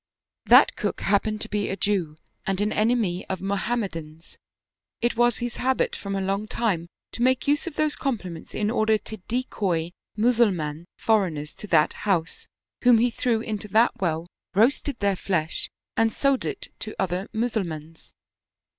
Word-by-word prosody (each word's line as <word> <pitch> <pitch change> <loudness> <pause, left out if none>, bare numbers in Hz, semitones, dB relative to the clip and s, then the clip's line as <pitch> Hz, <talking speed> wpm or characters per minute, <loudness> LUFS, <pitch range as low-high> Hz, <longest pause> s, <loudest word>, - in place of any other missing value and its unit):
"That - - +7
cook - - -2
happened 210 +1 +1
to - - -2
be 205 -1 -1
a - - -1
Jew 180 -8 0 0.3
and 195 -1 0
an 210 +1 +1
enemy 215 -5 +1
of 190 - -2
Mohammedans; 195 -6 -3 0.6
it 240 0 +1
was 240 0 +3
his 240 0 -4
habit 260 +1 +1
from 200 -1 -4
a 195 - -1
long 195 +2 -1
time 200 -8 -1 0.2
to - - -5
make 260 +2 +2
use 290 +4 +2
of 325 - -5
those 305 -1 +1
compliments 190 - -4
in 210 0 0
order 220 -2 +3
to 220 +1 -7
decoy 190 -9 -1 0.3
Mussulman 195 -10 +2
foreigners 170 -9 +1
to 210 - -9
that 155 -5 +4 0.2
house, 170 -3 0 0.4
whom 245 -2 +7
he 240 +2 +3
threw 230 -1 0
into 215 -2 -4
that 220 +2 +3
well, 165 -2 0 0.3
roasted 250 +5 +3
their 200 -1 +2
flesh, 170 -4 0 0.3
and 225 0 +3
sold 275 +3 +1
it - - -5
to 215 - -6
other 185 +1 -1
Mussulmans. 170 -9 -4
210 Hz, 160 wpm, -25 LUFS, 180-235 Hz, 0.6 s, That